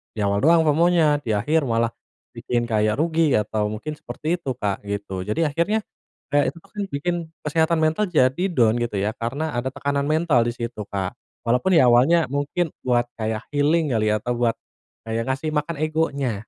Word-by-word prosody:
di - - -6
awal 100 0 +1
doang 165 +1 +6
FOMO-nya, 155 -2 +3
di 110 - -2
akhir 150 +10 +1
malah 115 -2 +1 0.5
bikin 120 -1 -1
kayak 110 +1 +1
rugi." 160 -2 +2
Atau 105 0 -1
mungkin 150 +8 -5
seperti 155 +3 -3
itu 170 -7 -4
Kak, 100 -1 -2
gitu. 100 -2 -4
Jadi, 130 - 0
akhirnya, 170 +9 0 0.5
kayak 145 -1 +2
itu - - -17
tuh - - -25
kan 205 - -2
bikin 160 +5 -1 0.3
kesehatan 160 +2 +1
mental 160 +6 +2
jadi 135 +3 +2
down, 115 -8 +3
gitu 105 -4 -2
ya, 105 +4 -1
karena 135 +5 -3
ada 125 +2 -2
tekanan 140 0 -1
mental 155 -5 +2
di 120 - -1
situ, 115 -2 -5
Kak. 95 +3 -3 0.3
Walaupun 125 +10 +2
ya 130 - +6
awalnya 130 +6 +4
mungkin 145 +6 -1 0.2
buat 120 -1 +1
kayak 110 -1 -3
healing, 150 -1 +2
kali, 110 -1 +2
atau 115 +3 -1
buat 120 -1 +1 0.5
kayak 115 +1 -1
ngasih 155 +4 -3
makan 150 +3 -1
egonya. 155 -6 0
135 Hz, 180 wpm, -23 LUFS, 115-160 Hz, 0.5 s, doang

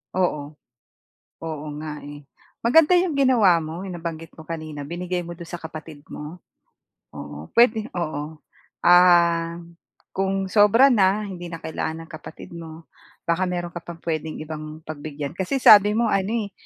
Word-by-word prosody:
Oo. 180 -4 +1 1.1
Oo 155 -2 -5
nga, 155 -1 -6
eh. 145 0 -10 0.4
Maganda 320 +8 +6
'yong 350 -2 +2
ginawa 235 -11 +4
mo, 165 +4 -6
'yong 190 - -6
nabanggit 165 -1 -6
mo 160 - -12
kanina, 155 -3 -6
binigay 180 +2 -3
mo 170 0 -8
do'n 170 - -9
sa 175 -1 -6
kapatid 160 -1 -9
mo. 155 +4 -8 0.8
Oo, 75 +2 -8
puwede 230 -2 +4
oo. 155 -2 -4 0.5
Ah, 170 -1 +5 0.6
kung 195 0 -1
sobra 225 +6 +6
na, 205 -1 +3
hindi 180 -3 -7
na 170 - -6
kailangan 160 0 -4
ng 160 - -20
kapatid 155 +1 -10
mo, 165 -1 -10 0.4
baka 180 +2 0
meron 175 -1 -3
ka 175 - -6
pang 170 0 -9
puwedeng 160 -1 -3
ibang 155 0 -8
pagbigyan, 145 -2 -6
kasi 190 +9 -2
sabi 210 -4 +7
mo 230 -2 +2
ano, 195 -1 +1 0.2
eh, 200 - -14
170 Hz, 155 wpm, -23 LUFS, 155-195 Hz, 1.1 s, sabi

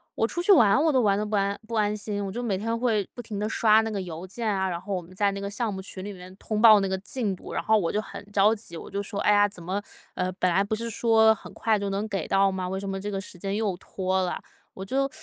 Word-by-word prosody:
我 225 - +1
出 345 - -3
去 405 - +4
玩 215 - +6
我 320 -1 +3
都 260 -2 +3
玩 200 -2 +3
得 210 - -1
不 210 0 -2
安 200 0 +1
不 230 - -4
安 210 -1 +1
心， 205 -1 -4
我 195 - -3
就 245 +4 -4
每 205 -5 0
天 230 +3 -2
会 225 -5 +1
不 245 - -6
停 210 -3 -6
地 210 - -1
刷 220 -1 +4
那 225 - -3
个 205 -2 -3
邮 175 +1 -7
件 225 +4 -4
啊， 190 -2 0
然 170 -1 -3
后 195 +2 -5
我 180 - -1
们 175 +2 -15
在 200 0 +2
那 200 - -5
个 200 - -3
项 215 0 -2
目 190 - -5
群 190 -1 -8
里 205 - -5
面 180 0 -11
通 215 0 -3
报 215 -3 +9
那 195 - 0
个 190 - -1
进 205 0 -2
度， - - -11
然 - - -2
后 220 0 +4
我 170 - -1
就 210 - 0
很 - - -9
着 205 +2 +4
急。 205 -6 -8
我 - - -9
就 200 0 -2
说： 200 0 -5
“哎 210 - +4
呀， 205 0 +5
怎 185 -4 -11
么， 190 +4 -2 0.3
呃， 180 0 -1
本 185 -1 +1
来 190 +3 +3
不 215 +2 -2
是 230 +1 -4
说 220 -1 +4
很 - - -12
快 220 -2 +1
就 200 0 -2
能 200 +2 -2
给 195 -6 -3
到 195 0 +3
吗？ 185 -1 -3
为 190 0 -3
什 200 - -6
么 195 0 -3
这 205 - -4
个 195 -1 -2
时 185 -2 -10
间 195 +2 -2
又 210 -4 0
拖 190 0 -2
了？” 180 - -2 0.4
我 190 - -6
就 275 +5 0
205 Hz, 330 characters per minute, -26 LUFS, 190-220 Hz, 0.4 s, 报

